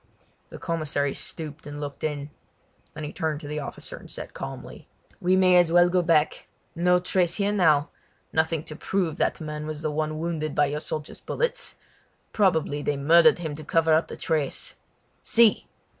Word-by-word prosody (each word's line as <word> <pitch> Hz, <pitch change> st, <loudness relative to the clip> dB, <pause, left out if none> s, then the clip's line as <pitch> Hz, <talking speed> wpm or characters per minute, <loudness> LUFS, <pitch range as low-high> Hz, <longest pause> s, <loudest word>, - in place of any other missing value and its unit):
The -, -, -9 dB
commissary 155 Hz, -4 st, -1 dB
stooped 150 Hz, -3 st, -6 dB
and 145 Hz, 0 st, -7 dB
looked 145 Hz, -1 st, -6 dB
in. 145 Hz, -1 st, -3 dB, 0.6 s
Then 155 Hz, -, -6 dB
he 150 Hz, -, -5 dB
turned 155 Hz, -2 st, -2 dB
to 145 Hz, -, -8 dB
the 150 Hz, +1 st, -3 dB
officer 140 Hz, -, -6 dB
and -, -, -13 dB
said -, -, -6 dB
calmly: -, -, -8 dB, 0.3 s
"We 185 Hz, +1 st, +3 dB
may 185 Hz, -1 st, +5 dB
as 175 Hz, -2 st, +4 dB
well 175 Hz, +1 st, +6 dB
go 180 Hz, 0 st, +2 dB
back. 160 Hz, -3 st, +1 dB, 0.3 s
No 180 Hz, +1 st, +3 dB
trace 180 Hz, -1 st, +1 dB
here 200 Hz, 0 st, +1 dB
now; 160 Hz, -7 st, +3 dB, 0.4 s
nothing 160 Hz, -1 st, +1 dB
to 155 Hz, -, -8 dB
prove 175 Hz, -1 st, -1 dB
that -, -, 0 dB
man 150 Hz, -1 st, -5 dB
was 155 Hz, 0 st, -5 dB
the 155 Hz, -, 0 dB
one 155 Hz, 0 st, -2 dB
wounded 155 Hz, -2 st, -3 dB
by 145 Hz, -, +4 dB
your 145 Hz, +1 st, -2 dB
soldiers' 155 Hz, -1 st, -5 dB
bullets! -, -, -2 dB, 0.6 s
Probably 160 Hz, -7 st, +2 dB
they 145 Hz, -1 st, -1 dB
murdered 170 Hz, +10 st, +6 dB
him 160 Hz, -4 st, -4 dB
to 155 Hz, -, -8 dB
cover 165 Hz, +1 st, +2 dB
up 160 Hz, +2 st, +3 dB
the -, -, -8 dB
trace. 155 Hz, -5 st, -1 dB, 0.5 s
See!" 230 Hz, -2 st, +4 dB
160 Hz, 180 wpm, -25 LUFS, 150-175 Hz, 0.6 s, well